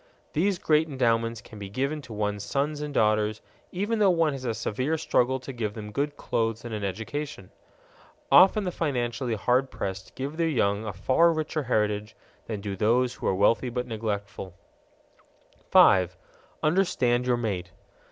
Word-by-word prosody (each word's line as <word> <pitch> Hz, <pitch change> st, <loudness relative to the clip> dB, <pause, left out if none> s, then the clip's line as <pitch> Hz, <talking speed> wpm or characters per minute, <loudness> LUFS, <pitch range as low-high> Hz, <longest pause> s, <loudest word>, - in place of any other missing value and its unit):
These 185 Hz, +4 st, +1 dB
great 155 Hz, -1 st, +2 dB
endowments 115 Hz, -4 st, 0 dB
can 110 Hz, -3 st, -12 dB
be 100 Hz, -1 st, -7 dB
given 140 Hz, +8 st, -2 dB
to 125 Hz, -4 st, -13 dB
one's 105 Hz, -1 st, -2 dB
sons 145 Hz, +7 st, -1 dB
and 150 Hz, 0 st, -4 dB
daughters 110 Hz, -3 st, +2 dB, 0.3 s
even 205 Hz, +5 st, -1 dB
though 205 Hz, -2 st, +5 dB
one 165 Hz, -4 st, +2 dB
has 130 Hz, -1 st, -6 dB
a 115 Hz, -2 st, -1 dB
severe 130 Hz, +8 st, -1 dB
struggle 130 Hz, -3 st, +1 dB
to 130 Hz, +1 st, -8 dB
give 110 Hz, -4 st, -3 dB
them 105 Hz, -2 st, -7 dB
good 145 Hz, +6 st, -2 dB
clothes 115 Hz, 0 st, -2 dB
and 120 Hz, -, -5 dB
an 105 Hz, -1 st, -4 dB
education. 110 Hz, +4 st, -5 dB, 0.8 s
Often 195 Hz, +3 st, +7 dB
the 180 Hz, -, -2 dB
financially 125 Hz, -6 st, -1 dB
hard 125 Hz, +5 st, +1 dB
pressed 95 Hz, -1 st, -6 dB
give 140 Hz, +4 st, -5 dB
their 165 Hz, -1 st, +1 dB
young 100 Hz, -6 st, +1 dB
a -, -, -2 dB
far 130 Hz, -, +3 dB
richer 155 Hz, -1 st, -2 dB
heritage 105 Hz, -4 st, -1 dB, 0.3 s
than 105 Hz, -3 st, -4 dB
do 100 Hz, -1 st, -4 dB
those 120 Hz, +5 st, +2 dB
who -, -, -5 dB
are -, -, +2 dB
wealthy 105 Hz, +5 st, +2 dB
but 125 Hz, +1 st, -3 dB
neglectful. 100 Hz, -5 st, -4 dB, 1.2 s
_5. 90 Hz, -2 st, +6 dB, 0.5 s
Understand 130 Hz, -8 st, +2 dB
your 125 Hz, -1 st, +2 dB
mate. 95 Hz, -7 st, -3 dB
120 Hz, 165 wpm, -27 LUFS, 105-145 Hz, 1.2 s, Often